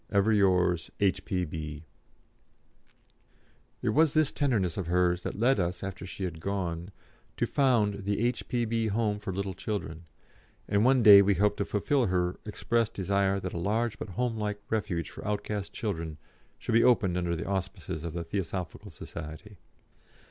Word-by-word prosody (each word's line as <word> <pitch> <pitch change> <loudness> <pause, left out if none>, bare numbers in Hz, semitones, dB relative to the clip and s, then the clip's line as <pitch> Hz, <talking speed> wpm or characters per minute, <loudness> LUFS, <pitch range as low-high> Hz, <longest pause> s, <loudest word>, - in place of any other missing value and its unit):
"Ever 100 +2 +3
yours, 90 -4 +3
"H.P.B." 80 -6 -1 2.0
It - - +2
was 155 0 +3
this 155 -2 +3
tenderness 110 - 0
of 95 -4 -3
hers 90 0 +2
that - - -5
led 125 +1 +3
us, 90 +1 -2
after 95 -1 -6
she 95 - -6
had 85 -3 -4
gone, 90 -2 -3 0.5
to - - +1
found 110 -7 +2
the 100 0 0
"H.P.B. 115 -2 0
Home 105 -1 0
for 105 -2 -4
little 95 +1 -3
children," 85 -5 -5 0.6
and 100 +1 +2
one 130 0 +4
day 100 -2 +10
we 100 0 +3
hope 105 +3 +2
to 100 - -1
fulfil 120 +5 +1
her 90 -1 0
expressed 115 +1 0
desire 100 0 +1
that 95 - -4
a 85 - -3
large 110 +4 0
but - - -5
homelike 110 -4 -1
Refuge 100 -7 -1
for - - -9
outcast 105 -1 -3
children 85 -8 -4 0.4
should - - -4
be 115 +1 +5
opened 110 -8 +4
under 85 -1 0
the 85 - -4
auspices 95 -4 -3
of 85 -2 -4
the 85 -1 -3
Theosophical 95 +3 -4
Society. 85 +4 -9
100 Hz, 155 wpm, -29 LUFS, 90-110 Hz, 2.0 s, day